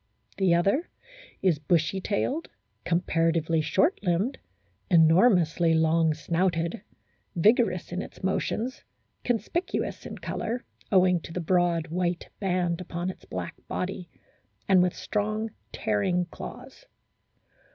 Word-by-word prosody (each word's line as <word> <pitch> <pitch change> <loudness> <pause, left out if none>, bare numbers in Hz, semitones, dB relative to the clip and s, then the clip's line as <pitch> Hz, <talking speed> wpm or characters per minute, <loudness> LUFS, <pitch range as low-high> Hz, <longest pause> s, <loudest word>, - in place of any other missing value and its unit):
The 185 -3 +4
other 200 - +1 0.5
is 175 -6 +3
bushy 165 +4 +1
tailed, 265 - -1 0.4
comparatively 165 -2 +1
short 305 - +2
limbed, 190 +7 0 0.5
enormously 170 -1 +5
long 160 0 +3
snouted, 170 +1 -1 0.5
vigorous 195 -1 +3
in 180 +2 -2
its - - -10
motions, 220 +6 -1 0.4
conspicuous 245 - -2
in - - -7
colour, 240 +2 -4 0.3
owing 185 -2 +5
to 165 - -10
the 180 - -3
broad 170 -1 +1
white 175 +1 -2
band 180 -3 0
upon 175 +1 -3
its - - -17
black - - -5
body, 180 -1 -4 0.6
and 190 -2 +6
with 180 -1 +1
strong, 215 +1 -2 0.2
tearing 175 - 0
claws. - - -10
180 Hz, 110 wpm, -27 LUFS, 165-195 Hz, 0.6 s, and